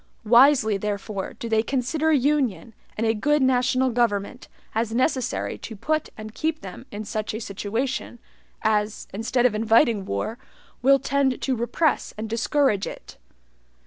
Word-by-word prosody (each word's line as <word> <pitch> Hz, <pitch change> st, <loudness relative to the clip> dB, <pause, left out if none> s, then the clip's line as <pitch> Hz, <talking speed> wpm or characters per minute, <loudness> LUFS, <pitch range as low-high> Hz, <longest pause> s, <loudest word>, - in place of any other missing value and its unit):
Wisely, 235 Hz, -2 st, +5 dB
therefore, 200 Hz, -1 st, -4 dB
do 235 Hz, -, -7 dB
they 220 Hz, -1 st, +2 dB
consider 275 Hz, +6 st, 0 dB
union 265 Hz, -, +1 dB, 0.2 s
and 225 Hz, -, 0 dB
a 225 Hz, -, +3 dB
good 295 Hz, +7 st, +1 dB
national 260 Hz, 0 st, +2 dB
government 225 Hz, -4 st, -1 dB, 0.3 s
as 225 Hz, 0 st, -1 dB
necessary 255 Hz, 0 st, -1 dB
to 225 Hz, -, -8 dB
put 310 Hz, +9 st, -1 dB
and 215 Hz, 0 st, -8 dB
keep 315 Hz, +3 st, -2 dB
them 195 Hz, +7 st, -9 dB
in 210 Hz, +1 st, -6 dB
SUCH 215 Hz, +1 st, -3 dB
A -, -, -3 dB
SITUATION 225 Hz, +5 st, -3 dB, 0.5 s
as, 210 Hz, -1 st, 0 dB
instead 225 Hz, +4 st, 0 dB
of 245 Hz, -, +4 dB
INVITING 225 Hz, -1 st, +3 dB
war, 100 Hz, -, -3 dB, 0.4 s
will 275 Hz, +2 st, +6 dB
tend 275 Hz, -1 st, 0 dB
to 265 Hz, -, -1 dB
repress 240 Hz, +7 st, 0 dB
and 220 Hz, +1 st, -4 dB
discourage 230 Hz, -2 st, +1 dB
it. -, -, -10 dB
235 Hz, 145 wpm, -24 LUFS, 215-265 Hz, 0.5 s, will